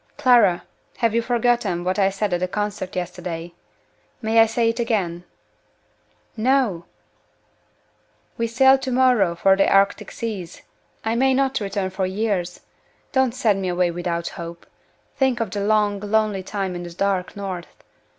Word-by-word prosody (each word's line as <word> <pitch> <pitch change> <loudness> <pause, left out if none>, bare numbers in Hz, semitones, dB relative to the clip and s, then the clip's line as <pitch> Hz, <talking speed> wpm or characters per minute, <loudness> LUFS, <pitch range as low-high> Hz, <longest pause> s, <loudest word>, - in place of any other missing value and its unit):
"Clara! 240 -10 +4 0.3
have 230 -2 +1
you 235 - +2
forgotten 235 -7 0
what 185 +3 -1
I 195 -1 +4
said 195 0 -2
at 175 - +1
the 185 - -1
concert 205 -1 -4
yesterday? 175 -1 -5 0.7
May 225 -1 +2
I 225 - +7
say 230 +1 +1
it 230 - -3
again?" 190 -7 -1 1.1
"No!" 230 -7 +1 1.5
"We 230 - -1
sail 265 +3 +5
to 265 - -4
morrow 245 -9 +3
for 190 +2 +4
the 195 - +2
Arctic 195 0 +2
seas. 200 -7 -6 0.4
I 220 - +1
may 260 +2 +3
not 270 0 +1
return 195 -2 -3
for 190 0 -1
years. 190 -3 -2 0.5
Don't 265 -2 +1
send 210 -6 +1
me 190 - -2
away 180 -1 +1
without 170 0 -3
hope! 170 0 -9 0.5
Think 265 -3 +2
of 225 -4 -2
the 205 - -3
long, 210 -1 +2
lonely 210 -1 0
time 190 -1 -3
in 175 - -5
the 175 -1 -8
dark 190 0 -1
North! 190 -4 -7
200 Hz, 155 wpm, -22 LUFS, 180-230 Hz, 1.5 s, I